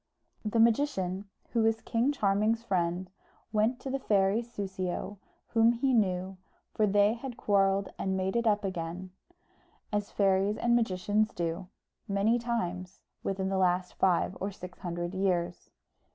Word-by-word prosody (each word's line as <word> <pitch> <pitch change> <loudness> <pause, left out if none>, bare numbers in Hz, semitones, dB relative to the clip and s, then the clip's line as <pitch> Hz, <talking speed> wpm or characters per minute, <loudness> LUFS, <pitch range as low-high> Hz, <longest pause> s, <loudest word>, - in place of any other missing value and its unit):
The 220 +1 0
magician, 205 -6 +2 0.2
who 230 - +2
was 225 0 +2
King 235 +5 +1
Charming's 215 -2 +1
friend, 180 -3 0 0.5
went 220 +4 +2
to 270 - -4
the 275 - -1
fairy 200 -2 +2
Soussio, 195 -3 -4 0.3
whom 230 0 +4
he 260 +3 +1
knew, 190 -4 +1 0.4
for 215 - +2
they 205 +1 +4
had 240 +1 -7
quarrelled 195 -1 +2
and 190 0 0
made 190 +2 -1
it 235 -1 +1
up 210 -1 +2
again, 180 0 -4 0.8
as 205 -1 -1
fairies 195 +1 +2
and 235 0 +2
magicians 210 -1 +1
do, 170 +2 -3 0.4
many 205 +4 +2
times 185 -6 -3 0.2
within 190 0 -2
the 190 -1 0
last 180 0 +1
five 185 0 +2
or 195 - -1
six 180 -2 -10
hundred 175 0 -4
years. 180 -3 -1
195 Hz, 145 wpm, -30 LUFS, 185-225 Hz, 0.8 s, whom